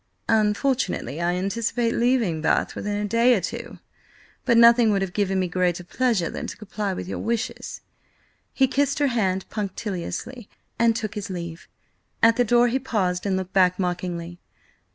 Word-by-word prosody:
"Unfortunately 210 Hz, -, +1 dB
I 175 Hz, +1 st, +1 dB
anticipate 230 Hz, +5 st, -1 dB
leaving 235 Hz, -10 st, +1 dB
Bath -, -, +1 dB
within 205 Hz, 0 st, -3 dB
a 210 Hz, -, -1 dB
day 235 Hz, +4 st, +4 dB
or -, -, +1 dB
two. 235 Hz, +6 st, -6 dB, 0.7 s
But 235 Hz, -3 st, +4 dB
nothing 235 Hz, 0 st, +7 dB
would 200 Hz, -2 st, +2 dB
have 185 Hz, -2 st, -5 dB
given 195 Hz, -2 st, 0 dB
me 185 Hz, -, 0 dB
greater 180 Hz, 0 st, 0 dB
pleasure 220 Hz, -2 st, 0 dB
than -, -, -5 dB
to -, -, -7 dB
comply 210 Hz, -1 st, -4 dB
with 180 Hz, -, -6 dB
your -, -, -4 dB
wishes." 230 Hz, 0 st, -3 dB, 0.7 s
He 265 Hz, -, +3 dB
kissed 280 Hz, +1 st, 0 dB
her 285 Hz, -2 st, +2 dB
hand 190 Hz, -4 st, 0 dB
punctiliously, 210 Hz, +3 st, -5 dB, 0.3 s
and 230 Hz, -1 st, +4 dB
took 215 Hz, -2 st, -3 dB
his 205 Hz, -1 st, -5 dB
leave. 170 Hz, -2 st, -6 dB, 0.6 s
At 230 Hz, 0 st, +6 dB
the 245 Hz, -, +3 dB
door 240 Hz, +1 st, +4 dB
he 250 Hz, +3 st, 0 dB
paused, 200 Hz, -8 st, -1 dB
and 190 Hz, -1 st, +1 dB
looked 190 Hz, 0 st, -5 dB
back 185 Hz, -2 st, +4 dB
mockingly. 175 Hz, -1 st, -3 dB
205 Hz, 170 wpm, -24 LUFS, 185-235 Hz, 0.7 s, nothing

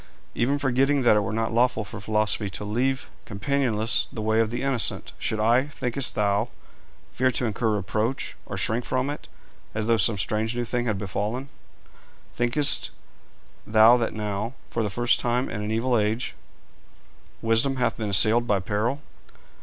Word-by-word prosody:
Even 135 Hz, +4 st, +1 dB
forgetting 135 Hz, 0 st, +1 dB
that 120 Hz, -, +5 dB
it -, -, +4 dB
were 105 Hz, +2 st, -2 dB
not 115 Hz, +1 st, -1 dB
lawful 120 Hz, -1 st, +2 dB
for 105 Hz, +1 st, -9 dB
Philosophy 105 Hz, 0 st, +1 dB
to 100 Hz, +2 st, -7 dB
leave 130 Hz, +5 st, -1 dB, 0.2 s
companionless 115 Hz, 0 st, 0 dB
the -, -, -7 dB
way 110 Hz, +1 st, +2 dB
of 115 Hz, -1 st, +2 dB
the 120 Hz, +3 st, -4 dB
innocent, 125 Hz, -, +1 dB
should 110 Hz, -, -1 dB
I, 120 Hz, +5 st, +3 dB
thinkest 135 Hz, -2 st, 0 dB
thou, 105 Hz, +2 st, +1 dB, 0.6 s
fear 130 Hz, +1 st, +1 dB
to 125 Hz, 0 st, -1 dB
incur 110 Hz, +1 st, -1 dB
reproach, 110 Hz, +6 st, -2 dB
or -, -, -5 dB
shrink 115 Hz, +3 st, +2 dB
from 130 Hz, +3 st, -1 dB
it, 145 Hz, -, -8 dB, 0.5 s
as 110 Hz, 0 st, -1 dB
though 115 Hz, 0 st, +3 dB
some 105 Hz, +1 st, +2 dB
strange 110 Hz, +5 st, -1 dB
new 120 Hz, 0 st, -1 dB
thing 120 Hz, +1 st, -2 dB
had 110 Hz, -3 st, 0 dB
befallen? 105 Hz, +7 st, -3 dB, 0.8 s
Thinkest 120 Hz, +4 st, +1 dB, 0.8 s
thou 110 Hz, +2 st, +7 dB
that 115 Hz, -2 st, -2 dB
now, 105 Hz, +2 st, -3 dB, 0.2 s
for 115 Hz, -, -1 dB
the 105 Hz, -, -1 dB
first 120 Hz, +4 st, +2 dB
time 120 Hz, +2 st, 0 dB
in 105 Hz, -, -4 dB
an 105 Hz, -, -3 dB
evil 120 Hz, +3 st, +1 dB
age, 110 Hz, +2 st, 0 dB, 1.1 s
Wisdom 115 Hz, +4 st, +2 dB
hath 125 Hz, -3 st, 0 dB
been 110 Hz, -2 st, -3 dB
assailed 110 Hz, +4 st, +4 dB
by 100 Hz, -3 st, +2 dB
peril? 110 Hz, +9 st, -2 dB
115 Hz, 170 wpm, -25 LUFS, 105-125 Hz, 1.1 s, thou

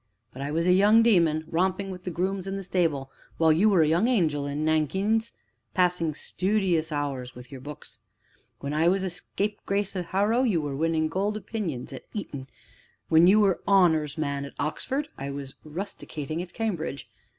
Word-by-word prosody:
But 130 Hz, -, -8 dB
I 140 Hz, -, -3 dB
was 165 Hz, +3 st, 0 dB
a 180 Hz, -, +4 dB
young 210 Hz, +4 st, +6 dB
demon, 170 Hz, -8 st, +3 dB
romping 190 Hz, +3 st, 0 dB
with 180 Hz, -1 st, -9 dB
the -, -, -2 dB
grooms 185 Hz, +2 st, -2 dB
in 195 Hz, -, -3 dB
the 195 Hz, -, -5 dB
stable, 160 Hz, -7 st, 0 dB, 0.3 s
while 160 Hz, -1 st, +5 dB
you 195 Hz, +7 st, +4 dB
were 185 Hz, -6 st, +5 dB
a -, -, +2 dB
young 170 Hz, +9 st, +3 dB
angel 155 Hz, -, +1 dB
in 145 Hz, +2 st, -2 dB
nankeens, 190 Hz, +9 st, +1 dB, 0.4 s
passing 175 Hz, -4 st, +1 dB
studious 180 Hz, -4 st, 0 dB
hours 135 Hz, -4 st, -3 dB
with 125 Hz, +1 st, -12 dB
your 135 Hz, -2 st, -8 dB
books. 150 Hz, +2 st, -9 dB, 0.6 s
When 140 Hz, +1 st, -3 dB
I 160 Hz, +2 st, +3 dB
was 190 Hz, +2 st, +2 dB
a 190 Hz, -, -2 dB
scapegrace 200 Hz, +1 st, -2 dB
at 180 Hz, -2 st, -3 dB
Harrow, 205 Hz, +7 st, +2 dB
you 220 Hz, -10 st, +2 dB
were 145 Hz, -3 st, -3 dB
winning 160 Hz, +1 st, +1 dB
golden 200 Hz, +5 st, -1 dB
opinions 185 Hz, -, -4 dB
at -, -, -10 dB
Eton; 140 Hz, -10 st, -5 dB, 0.6 s
when 165 Hz, +2 st, +6 dB
you 205 Hz, +3 st, +6 dB
were 195 Hz, -3 st, +3 dB
an -, -, -29 dB
'honors' 160 Hz, -7 st, +3 dB
man 140 Hz, -2 st, -2 dB
at 140 Hz, -, -9 dB
Oxford, 270 Hz, -, -2 dB
I 140 Hz, +1 st, -4 dB
was 140 Hz, -1 st, -6 dB
'rusticated' 155 Hz, -2 st, -5 dB
at 180 Hz, -1 st, -8 dB
Cambridge. 175 Hz, -10 st, -3 dB
170 Hz, 185 wpm, -26 LUFS, 150-195 Hz, 0.6 s, young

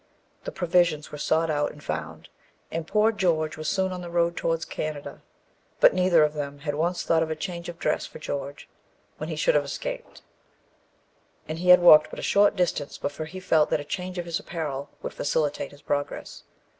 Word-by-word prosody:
The -, -, -4 dB
provisions 170 Hz, -4 st, +1 dB
were 150 Hz, -, -7 dB
sought 160 Hz, +2 st, +1 dB
out 145 Hz, -1 st, 0 dB
and 150 Hz, -, -15 dB
found, -, -, -5 dB, 0.4 s
and 165 Hz, 0 st, -4 dB
poor 215 Hz, +3 st, +3 dB
George 165 Hz, -7 st, 0 dB
was 155 Hz, -1 st, -3 dB
soon 190 Hz, -1 st, 0 dB
on 180 Hz, -1 st, -5 dB
the 175 Hz, -, -7 dB
road 170 Hz, 0 st, +1 dB
towards 165 Hz, -1 st, -1 dB
Canada. 155 Hz, -2 st, -5 dB, 0.6 s
But -, -, +7 dB
neither 180 Hz, -3 st, +4 dB
of 150 Hz, 0 st, +1 dB
them 145 Hz, -1 st, -5 dB
had 145 Hz, 0 st, -2 dB
once 170 Hz, +4 st, -1 dB
thought 165 Hz, -1 st, +2 dB
of 160 Hz, -, -1 dB
a 160 Hz, -, -2 dB
change 170 Hz, +2 st, -5 dB
of 170 Hz, -, -8 dB
dress 155 Hz, -, -1 dB
for -, -, -11 dB
George 140 Hz, -2 st, -5 dB, 0.5 s
when -, -, -5 dB
he -, -, -3 dB
should -, -, +2 dB
have -, -, +3 dB
escaped, -, -, -6 dB, 1.2 s
and 155 Hz, +1 st, -4 dB
he 180 Hz, +1 st, -1 dB
had 180 Hz, 0 st, +9 dB
walked 155 Hz, -3 st, +8 dB
but -, -, -9 dB
a -, -, -6 dB
short 205 Hz, +1 st, +4 dB
distance 170 Hz, -6 st, -1 dB
before 145 Hz, +2 st, -4 dB
he 185 Hz, +4 st, -8 dB
felt 160 Hz, -5 st, +3 dB
that -, -, +1 dB
a -, -, -5 dB
change 180 Hz, +4 st, -5 dB
of 175 Hz, -, -3 dB
his 170 Hz, -1 st, -2 dB
apparel 145 Hz, -4 st, -5 dB
would -, -, -4 dB
facilitate 150 Hz, 0 st, -1 dB
his 145 Hz, -, -17 dB
progress. 145 Hz, 0 st, -4 dB
160 Hz, 205 wpm, -26 LUFS, 150-180 Hz, 1.2 s, had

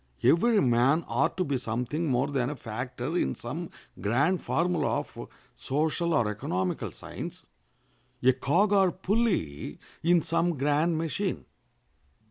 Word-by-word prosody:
Every 220 Hz, +6 st, +4 dB
man 130 Hz, +6 st, +3 dB
ought 120 Hz, +8 st, 0 dB
to 185 Hz, -, +2 dB
be 140 Hz, -5 st, -1 dB
something 125 Hz, +8 st, -2 dB
more 130 Hz, +1 st, +1 dB
than 135 Hz, -3 st, 0 dB
a 150 Hz, -, -4 dB
factor 125 Hz, +5 st, -5 dB
in -, -, +1 dB
some 160 Hz, +8 st, -5 dB, 0.3 s
grand 140 Hz, -, +1 dB
formula 175 Hz, +1 st, +1 dB
of -, -, -10 dB, 0.3 s
social 160 Hz, +4 st, 0 dB
or 120 Hz, -7 st, +3 dB
economical 95 Hz, -3 st, -2 dB
science, -, -, -8 dB, 0.8 s
a 130 Hz, +1 st, +6 dB
cog 170 Hz, +11 st, +2 dB
or 190 Hz, -2 st, +5 dB
pulley 190 Hz, -, -1 dB, 0.2 s
in 170 Hz, -1 st, +4 dB
some 170 Hz, 0 st, 0 dB
grand 150 Hz, +4 st, +2 dB
machine. 165 Hz, +4 st, -2 dB
150 Hz, 130 wpm, -28 LUFS, 125-175 Hz, 0.8 s, a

